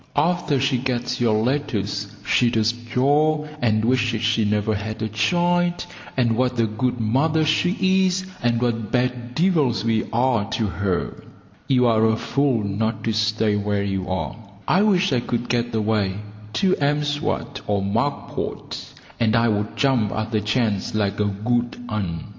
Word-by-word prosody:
After 155 Hz, -2 st, +1 dB
she 130 Hz, -1 st, +1 dB
gets 125 Hz, -1 st, -2 dB
your 115 Hz, -3 st, +3 dB
letters 115 Hz, -7 st, -1 dB, 0.2 s
she 120 Hz, -, +3 dB
does 110 Hz, -1 st, +2 dB
jaw, 145 Hz, +6 st, +1 dB, 0.2 s
and 110 Hz, -2 st, +2 dB
wishes 120 Hz, -2 st, +1 dB
she 115 Hz, 0 st, +2 dB
never 105 Hz, +1 st, +1 dB
had 110 Hz, +1 st, -4 dB
a -, -, 0 dB
child, 175 Hz, -, +1 dB, 0.3 s
and 120 Hz, -3 st, +2 dB
what 125 Hz, 0 st, 0 dB
a 115 Hz, -, +4 dB
good 120 Hz, +3 st, -2 dB
mother 145 Hz, +8 st, +2 dB
she 190 Hz, +4 st, +2 dB
is, 185 Hz, +1 st, -1 dB, 0.2 s
and 120 Hz, -1 st, +1 dB
what 115 Hz, -3 st, -1 dB
bad 125 Hz, -1 st, -1 dB
devils 155 Hz, -, +2 dB
we 110 Hz, -1 st, +1 dB
are 120 Hz, -3 st, +1 dB
to 110 Hz, -, 0 dB
her. 95 Hz, -2 st, -2 dB, 0.4 s
You 125 Hz, -2 st, +3 dB
are 110 Hz, -2 st, +3 dB
a 110 Hz, 0 st, +2 dB
fool 135 Hz, -3 st, 0 dB
not 110 Hz, +2 st, -2 dB
to 115 Hz, -, 0 dB
stay 110 Hz, -1 st, +1 dB
where 105 Hz, -1 st, 0 dB
you 95 Hz, -2 st, -2 dB
are. 95 Hz, 0 st, -2 dB, 0.3 s
I 185 Hz, -, +4 dB
wish 195 Hz, -2 st, +3 dB
I 125 Hz, -, +3 dB
could 120 Hz, 0 st, -3 dB
get 120 Hz, -1 st, -1 dB
away 105 Hz, -3 st, 0 dB, 0.4 s
to 190 Hz, -, +2 dB
M'Swat 145 Hz, -1 st, -1 dB
or 100 Hz, -1 st, 0 dB
Mack 115 Hz, +9 st, -1 dB
Pot, -, -, -6 dB, 0.2 s
and 115 Hz, -1 st, +2 dB
I 115 Hz, 0 st, +3 dB
would 105 Hz, 0 st, -1 dB
jump 125 Hz, -8 st, +2 dB
at 110 Hz, +2 st, -3 dB
the 110 Hz, -2 st, +1 dB
chance 105 Hz, -2 st, 0 dB
like 100 Hz, -1 st, 0 dB
a 105 Hz, -, +2 dB
good 120 Hz, +4 st, -1 dB
un. 95 Hz, -7 st, -3 dB
115 Hz, 165 wpm, -22 LUFS, 110-135 Hz, 0.4 s, a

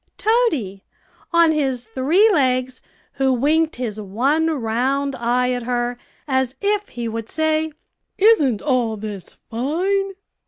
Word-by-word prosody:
Toady, 315 Hz, -, 0 dB, 0.5 s
on 335 Hz, -1 st, +5 dB
his 265 Hz, -5 st, -1 dB
three 275 Hz, -, +3 dB
legs, 255 Hz, -5 st, +1 dB, 0.3 s
who 270 Hz, -1 st, +1 dB
winked 305 Hz, +6 st, +2 dB
his 220 Hz, -4 st, -4 dB
one 265 Hz, +11 st, +1 dB
round 270 Hz, 0 st, -1 dB
eye 250 Hz, +1 st, +1 dB
at 250 Hz, -1 st, -2 dB
her, 240 Hz, 0 st, -1 dB, 0.3 s
as 260 Hz, -1 st, 0 dB
if 415 Hz, 0 st, 0 dB
he 240 Hz, -1 st, -5 dB
would 225 Hz, 0 st, -5 dB
say, 315 Hz, 0 st, 0 dB, 0.5 s
"Isn't 310 Hz, -, +4 dB
all 245 Hz, -6 st, 0 dB
this 205 Hz, -3 st, -8 dB
fine?" 370 Hz, -, -1 dB
260 Hz, 125 wpm, -21 LUFS, 240-315 Hz, 0.5 s, on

